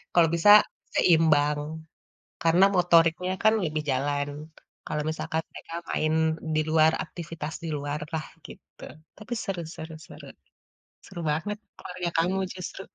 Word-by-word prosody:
Kalau 170 -2 +5
bisa 170 +5 +4 0.5
seimbang. 150 -3 +4 0.8
Karena 170 +3 +5
motoriknya 175 0 +3
kan 220 +1 +5
lebih 155 -1 -2
jalan, 145 +2 -1 0.6
kalau 150 - -2
misalkan 160 0 -3
mereka 165 - -10 0.2
main 155 0 0 0.4
di 155 - +3
luar, 160 0 +4
aktivitas 165 -2 -7
di - - -3
luar 145 +1 -4
lah, 155 -1 -2 0.2
gitu. - - -14 0.3
Tapi 220 +3 -10
seru 190 -3 -3
seru 160 0 -8
seru. - - -12 0.8
Seru 190 -3 -8
banget, 205 +8 -2 0.2
keluarga 180 -1 -5
kamu 180 +4 +1 0.2
justru, 185 +1 -7
165 Hz, 130 wpm, -26 LUFS, 155-180 Hz, 0.8 s, Kalau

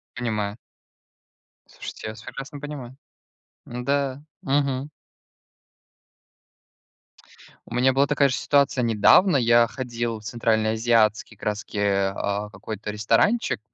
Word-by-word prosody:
Понимаю. 105 -4 -2 1.1
Слушайте, - - -9
я 110 - -4
вас 110 - -13
прекрасно 135 +4 -8
понимаю. 140 -4 -8 0.7
Н-да, 135 +3 -2 0.2
мгм. 140 0 0 2.8
У - - -9
меня 130 +2 +3
была 135 +2 +3
такая 145 -1 +3
же - - -1
ситуация, 140 -2 +2
недавно 120 - +5
я 120 -1 +5
ходил 120 -2 -4
в - - -16
центральноазиатский, 110 -1 +1
как - - -11
раз-таки, 105 0 -3
а, 100 +1 0
какой-то 105 +1 -6
ресторанчик, 115 - +1
120 Hz, 105 wpm, -24 LUFS, 110-135 Hz, 2.8 s, недавно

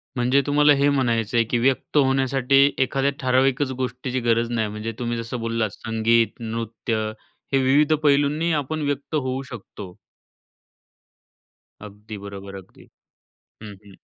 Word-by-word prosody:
म्हणजे 125 +3 +2
तुम्हाला 145 0 +5
हे 140 +1 +2
म्हणायचं 120 -4 0
आहे, 115 - +5
की 120 - -1
व्यक्त 135 +4 0
होण्यासाठी 135 0 +3
एखाद्या 135 +1 0
ठराविकच 130 +1 +1
गोष्टीची 130 +1 -3
गरज 115 0 +1
नाही 110 -2 0
म्हणजे 105 +2 -5
तुम्ही 120 -1 -2
जसं 115 +2 -5
बोललात 115 -1 -1
संगीत, 115 0 +1
नृत्य 115 -1 -3 0.4
हे - - +5
विविध 145 +4 +4
पैलूंनीही 145 +3 +2
आपण 155 +1 -2
व्यक्त 145 +2 -3
होऊ 130 -2 -1
शकतो. 100 -5 -10 1.9
अगदी 105 +1 -10
बरोबर. 100 0 -9
अगदी. 95 -1 -14 0.7
हं, 105 -2 -9
हं. 100 - -15
125 Hz, 130 wpm, -23 LUFS, 115-135 Hz, 1.9 s, तुम्हाला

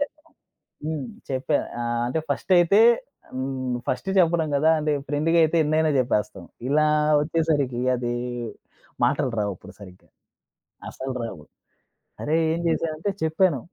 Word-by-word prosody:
చెప్పడం 300 +2 -6 0.5
హ్మ్. 155 -4 -3 0.2
చెప్పా. 135 +2 0 0.2
ఆహ్, 120 0 -1
అంటే 130 - -1
ఫస్ట్ 140 +6 -2
అయితే 175 +4 +4 0.5
హ్మ్. 130 -1 -3
ఫస్ట్ 190 +9 -2
చెప్పడం 165 -2 +3
కదా! 155 +3 +3
అంటే 150 0 0 0.2
ఫ్రెండ్‌గా 155 +3 +1
అయితే 160 +1 +2
ఎన్నైనా 155 +1 +2
చెప్పేస్తాం. 105 -7 -1 0.2
ఇలా 155 +2 +3 0.3
వచ్చేసరికి 150 -6 0
అది 120 0 -2 0.9
మాటలు 145 -3 +1
రావు 100 -1 0
అప్పుడు - - -13
సరిగ్గా. 90 -2 -14 0.8
అసలు 130 0 -5
రావు. 95 -9 -6 0.8
అరేయ్! 160 +2 +1
ఏం 170 - -2
చేశానంటే 165 +3 -1
చెప్పాను. 160 -2 +2
150 Hz, 125 wpm, -24 LUFS, 130-160 Hz, 0.9 s, అయితే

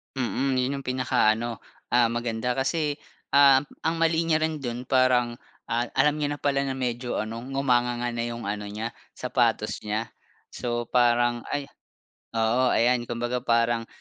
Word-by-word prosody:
Mm, 130 +1 0
yun 130 +2 0
yung - - -10
pinakaano 120 -3 +1 0.3
ah, 120 -2 +4
maganda 120 +1 -2
kasi 145 +3 -1 0.3
ah, 140 -1 +6 0.2
ang 165 - +1
mali 165 0 +1
niya 155 -1 +2
rin 160 -1 -1
dun 120 -1 -4
parang 125 -2 +2 0.3
ah, 120 +1 +1
alam 150 +1 +3
niya 145 0 -1
na - - -15
pala 140 -1 +1
na 130 - -2
medyo 125 -1 -2
ano, 110 +2 -3
ngumanganga 120 -2 0
na 120 0 -2
yung 115 -1 -5
ano 105 +1 -3
niya 110 +3 -4 0.2
sapatos 120 -4 0
niya. 110 +2 -2 0.4
So 120 -1 -2
parang 120 -1 +2
ay 145 - -2 0.7
oo 115 +3 +2
ayan 120 +1 +3
kumbaga 120 +1 -2
parang 115 0 +1
120 Hz, 155 wpm, -26 LUFS, 115-135 Hz, 0.7 s, ah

